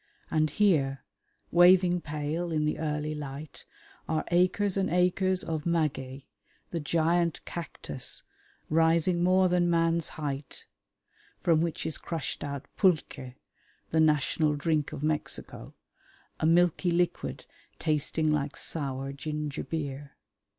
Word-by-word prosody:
And 155 0 +2
here, 145 -7 +2 0.5
waving 180 0 +6
pale 155 +3 -3
in 155 -1 +1
the 150 - -1
early 150 -1 -2
light, 145 0 -8 0.4
are 155 -1 0
acres 185 +3 +2
and 195 -1 +1
acres 180 +1 +2
of 160 -1 -3
maguey, 140 -5 -1 0.4
the 170 - -2
giant 165 +2 +1
cactus 170 -4 -5 0.4
rising 165 +2 +3
more 185 +1 +4
than 175 -1 +2
man's 165 -1 +2
height, 145 -2 -5 0.7
from 165 -2 +3
which 165 -2 -2
is 160 -2 -3
crushed 165 -4 -4
out 140 -2 -5
pulque, 155 - +1 0.6
the 160 - +2
national 150 0 +3
drink 150 0 0
of 150 -2 -6
Mexico, 150 - -3 0.6
a 155 - +2
milky 175 +1 +3
liquid 175 0 -1 0.3
tasting 155 0 0
like 145 -1 -2
sour 135 -3 -3
ginger 150 0 -4
beer. 145 -3 -5
160 Hz, 120 wpm, -29 LUFS, 150-175 Hz, 0.7 s, waving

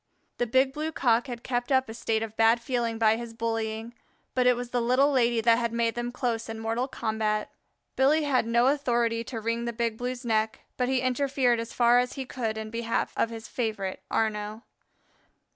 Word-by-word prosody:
The 245 - +1
Big 260 +3 +3
Blue 310 +2 -3
cock 245 -3 +2
had 240 -2 -6
kept 245 +1 -2
up 260 0 +3
a 225 - -7
state 225 -1 -1
of 220 -1 -7
bad 225 +1 +4
feeling 235 -1 -1
by 220 -1 +4
his 235 -1 -7
bullying, 225 0 -3 0.4
but 250 -1 +2
it 250 - +5
was 245 0 -6
the 245 - +1
Little 255 +5 +3
Lady 240 -3 +2
that 230 +1 +4
had 235 -1 -1
made 230 -1 +1
them 240 0 -3
close 235 -3 -2
in 225 0 -5
mortal 225 +3 -1
combat. 220 -4 -2 0.4
Billy 295 +4 +3
had 260 -5 +1
no 235 +1 +3
authority 240 -5 +1
to 230 -1 -5
wring 230 +2 -2
the 235 - -2
Big 230 -1 -2
Blue's 250 0 -4
neck, 220 -1 0
but 250 0 0
he 260 -1 +1
interfered 255 -1 +1
as 230 0 -5
far 240 0 +4
as 250 0 -1
he 270 -2 -5
could 225 -4 -3
in 220 0 -5
behalf 230 0 -1
of 230 - +1
his 225 -1 -8
favorite 215 -6 -3
Arnaux. 215 0 -1
235 Hz, 205 wpm, -27 LUFS, 225-250 Hz, 0.4 s, it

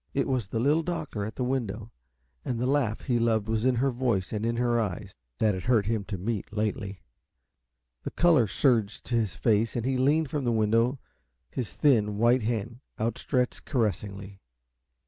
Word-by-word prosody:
It 140 - +1
was 125 -7 -1
the 110 - -2
Little 145 +7 +3
Doctor 155 -11 -3
at 110 - -6
the 125 - -2
window, 115 -4 -2 0.5
and 120 -2 -2
the 125 - 0
laugh 130 -5 +1
he 120 -3 0
loved 110 -2 +1
was 110 +1 0
in 130 -1 +3
her 135 +3 +1
voice 120 -7 -1
and 105 0 -2
in 115 - 0
her 120 -1 +2
eyes, 100 -5 -4 0.2
that 110 -2 +2
it 95 -1 -5
hurt 115 -5 +3
him 110 -2 -1
to 100 -2 -4
meet, 105 +2 -3
lately. 105 -2 -3 1.0
The - - -4
color 165 -10 +4
surged 110 -3 +1
to 120 - -1
his 110 -9 0
face, 110 +6 +1
and 120 -1 -2
he 130 0 +1
leaned 145 +3 +2
from 145 -2 -1
the 120 - +1
window, 115 +4 +2 0.5
his 125 -4 -4
thin, 105 -8 +2
white 120 +3 +4
hand 115 +1 -3 0.2
outstretched 125 +3 -1
caressingly. 100 - -2
115 Hz, 185 wpm, -27 LUFS, 105-125 Hz, 1.0 s, color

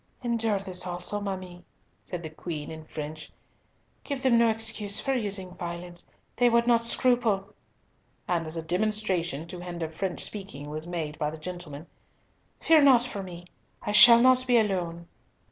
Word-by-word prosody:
"Endure 230 -3 +1
this 185 -2 -3
also, 180 +3 -3
ma 200 -1 -2
mie," 180 -1 -11 0.4
said 175 -2 -7
the 160 - -5
Queen, 155 -2 -6
in 160 0 -9
French. 155 0 -7 0.7
"Give 280 -2 -4
them 260 -3 +4
no 235 -1 +5
excuse 220 -2 -1
for 270 - -1
using 200 -6 -2
violence. 175 0 -7 0.3
They 245 0 +5
would 235 0 +3
not 235 -1 +3
scruple—" 230 -5 +1 0.7
and 170 -2 -1
as 160 +1 -5
a 165 - -3
demonstration 180 -4 -1
to 180 - -7
hinder 175 -2 -5
French 175 +3 -3
speaking 190 -8 -6
was 155 +2 -4
made 160 -4 -4
by 150 - 0
the 160 - -8
gentlemen, 160 -2 -8 0.8
"Fear 320 -2 +5
not 260 -4 +6
for 225 -5 -5
me, 175 -2 -9 0.4
I 210 - -2
shall 235 +3 +9
not 255 0 +5
be 245 -1 +5
alone." 175 -6 -1
185 Hz, 165 wpm, -27 LUFS, 170-225 Hz, 0.8 s, shall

